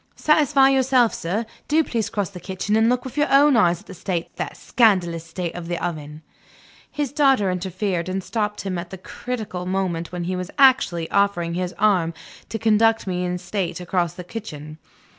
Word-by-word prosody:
Satisfy 290 -3 +4
yourself, 260 -3 +3
sir; 200 +7 -2 0.2
do 315 +2 +3
please 230 -7 -2
cross 200 -2 -2
the 180 - -9
kitchen 190 +3 -2
and 225 +1 +4
look 250 +1 0
with 260 +2 -8
your 295 +1 +3
own 280 0 +6
eyes 175 -7 +3
at - - -21
the - - -10
state, 175 -1 -4
the - - -3
scandalous 180 -8 +2
state, 170 +1 -5
of 175 -1 -7
the 175 0 -2
oven." 155 -3 -5 0.7
His 290 -3 -3
daughter 270 -9 +3
interfered, 185 -1 -2
and 190 0 -2
stopped 210 +1 -2
him 185 -3 -3
at 175 0 -7
the 190 - -8
critical 205 -2 -6
moment 185 -3 -2
when 180 -1 -4
he 185 +2 -2
was 180 0 -4
actually 255 -12 +4
offering 200 -4 +1
his 180 +1 -3
arm 180 -6 +2 0.3
to 225 - -3
conduct 225 0 +3
me 180 -2 -2
in 180 0 -2
state 180 0 -3
across 175 -2 -1
the 180 - -7
kitchen. 155 -7 -8
190 Hz, 190 wpm, -22 LUFS, 175-225 Hz, 0.7 s, own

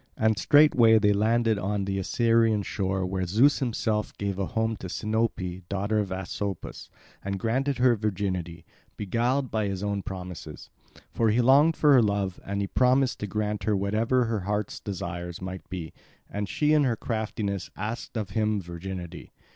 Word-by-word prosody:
And 110 0 +3
straightway 120 - +6
they 105 -1 +4
landed 110 +1 +2
on 100 0 -1
the 95 0 -2
Assyrian 115 +1 +2
shore 95 -1 -2
where 95 0 -2
Zeus 120 +11 +4
himself 110 -4 -1
gave 100 -1 -3
a 95 - -1
home 110 0 -1
to 95 - -7
Sinope, 105 -4 -2
daughter 100 +2 0
of 100 -3 -2
Asopus, 95 +1 -5 0.3
and 100 0 -2
granted 130 +7 0
her 125 -1 +4
virginity, 95 -5 -3 0.3
beguiled 120 +6 0
by 110 -2 0
his 95 0 -3
own 100 -1 -1
promises. 90 -5 -8 0.4
For 115 -1 +1
he 110 +3 +2
longed 140 +6 +5
for 150 -2 +5
her 130 - +7
love, 100 -4 -1
and 100 +1 -3
he - - 0
promised 130 +3 +2
to 105 - -3
grant 105 +1 -2
her 105 -2 +2
whatever 110 +6 +1
her 115 -2 -1
hearts 105 +2 -3
desire 90 -2 -5
might 95 0 -7
be. 85 -3 -6 0.4
And 105 0 -3
she 150 0 +2
in 150 -1 +4
her 125 -4 +1
craftiness 105 -4 -3
asked 110 +4 -5
of 105 -3 -4
him 105 0 +1
virginity. 90 0 -7
105 Hz, 170 wpm, -27 LUFS, 95-115 Hz, 0.4 s, her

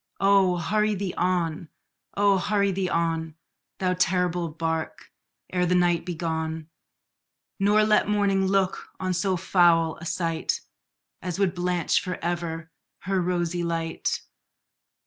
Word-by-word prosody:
Oh! 195 -2 +4
hurry 210 +5 +1
thee 195 -2 -3
on 175 -3 -1 0.5
oh! 200 -1 +4
hurry 200 +1 +1
thee 185 -1 -1
on, 165 -2 -1 0.4
Thou 185 -1 +1
terrible 180 -1 +1
bark, 160 0 -4 0.4
ere 180 -1 +1
the 180 - +2
night 175 -1 +2
be 175 - -3
gone, 160 -1 -3 0.9
Nor 205 +2 +4
let 215 0 +3
morning 200 -2 +2
look 195 -1 0
on 185 -1 -1
so 185 +1 0
foul 170 -3 +3
a 170 - -10
sight 165 -2 -1 0.6
As 180 -1 -4
would 195 -3 +1
blanch 175 -2 +1
for 180 -1 -4
ever 165 -1 -3 0.3
her 190 0 0
rosy 175 -1 -1
light! 165 -1 -2
180 Hz, 130 wpm, -25 LUFS, 165-190 Hz, 0.9 s, Oh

